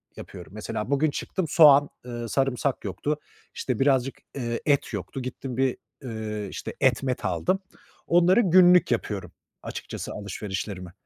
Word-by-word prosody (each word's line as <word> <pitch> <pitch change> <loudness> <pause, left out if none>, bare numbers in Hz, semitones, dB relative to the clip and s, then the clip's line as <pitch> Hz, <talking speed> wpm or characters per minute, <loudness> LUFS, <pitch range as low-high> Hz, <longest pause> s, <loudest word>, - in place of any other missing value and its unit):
yapıyorum. 90 -1 -10
Mesela 105 +1 -4
bugün 145 +2 +2
çıktım 185 +4 -3
soğan, 145 -3 +7 0.2
ııı, 120 -2 -5
sarımsak 135 0 0
yoktu. 150 +1 -2 0.3
İşte, 125 -4 -3
birazcık, 135 -1 +2 0.2
ııı, 120 -2 -2
et 140 -2 +1
yoktu. 135 - -5
Gittim 130 0 -6
bir, 130 -1 +1 0.3
ııı, 110 -3 -4
işte - - -6
et 130 -1 +3
met 125 -5 -2
aldım. 90 - 0 0.5
Onları 175 +6 +5
günlük 180 - +6
yapıyorum 100 -6 -2 0.3
açıkçası - - -6
alışverişlerimi. 95 -2 -5
130 Hz, 135 wpm, -26 LUFS, 105-145 Hz, 0.5 s, soğan